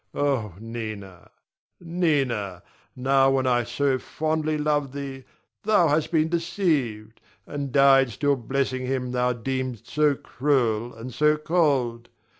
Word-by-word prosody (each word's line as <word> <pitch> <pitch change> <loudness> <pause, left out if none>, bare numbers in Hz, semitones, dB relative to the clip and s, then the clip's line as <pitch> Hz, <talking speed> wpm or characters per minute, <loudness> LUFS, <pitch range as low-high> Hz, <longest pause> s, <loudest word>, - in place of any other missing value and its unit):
Oh, 130 - 0
Nina, 110 -5 -7 0.5
Nina, 135 - -1 0.3
now 135 +1 +3
when 135 -1 +1
I 120 -1 +2
so 130 +3 0
fondly 155 +1 -1
love 150 -2 0
thee, 135 -2 -6 0.4
thou 200 -6 +3
hast 150 +2 +1
been 160 -2 +3
deceived, 160 - -1 0.2
and 140 -2 -5
died 135 -1 +5
still 140 +6 +1
blessing 130 +1 -2
him 125 -1 -2
thou 125 0 +1
deemed 130 -1 -4
so 150 -2 +2
cruel 120 -5 0
and 115 +2 -8
so 150 +3 +3
cold. 140 -8 0
135 Hz, 125 wpm, -25 LUFS, 120-150 Hz, 0.5 s, died